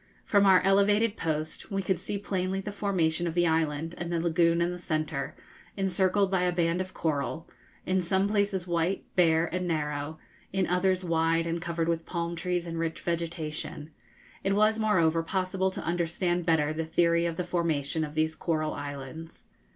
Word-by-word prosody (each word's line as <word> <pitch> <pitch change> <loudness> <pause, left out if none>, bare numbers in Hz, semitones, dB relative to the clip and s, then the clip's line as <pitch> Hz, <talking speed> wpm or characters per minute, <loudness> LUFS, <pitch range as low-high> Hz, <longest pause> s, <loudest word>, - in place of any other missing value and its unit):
From 200 -1 +4
our 190 -1 +7
elevated 205 +3 +3
post 155 -3 -3
we 195 -1 -1
could 185 -2 0
see 200 +2 -3
plainly 190 -1 -2
the 205 +2 -5
formation 175 -5 0
of 165 - -3
the 175 0 +3
island, 160 0 0
and 175 0 -4
the 170 - +1
lagoon 170 0 +3
in 170 +1 +1
the 180 - -6
centre, 155 -4 -2 0.4
encircled 190 +1 +2
by 190 -2 +2
a 180 0 +2
band 175 0 +1
of 185 0 -7
coral, 160 +1 -2 0.4
in 185 0 +1
some 190 +3 +1
places 200 -3 0
white, 175 +2 0
bare, 165 -3 +4
and 180 0 -1
narrow, 150 -1 -2 0.3
in 190 -1 +1
others 185 +1 +1
wide 165 0 +2
and 165 0 -2
covered 165 -1 -2
with 165 -1 -1
palm 170 -1 -2
trees 175 +1 -1
and 165 -1 -4
rich 165 -1 -2
vegetation; 160 -2 -4 0.5
it 195 - +1
was 215 +2 +3
moreover 170 -7 +3
possible 190 +2 0
to 185 - -6
understand 175 +1 -1
better 155 -2 +3
the 160 +1 -2
theory 170 +1 +2
of 165 - -3
the 180 - -2
formation 165 -3 -1
of 150 0 -6
these 160 0 +1
coral 155 -2 -1
islands. 145 +3 -7
170 Hz, 180 wpm, -28 LUFS, 160-185 Hz, 0.5 s, our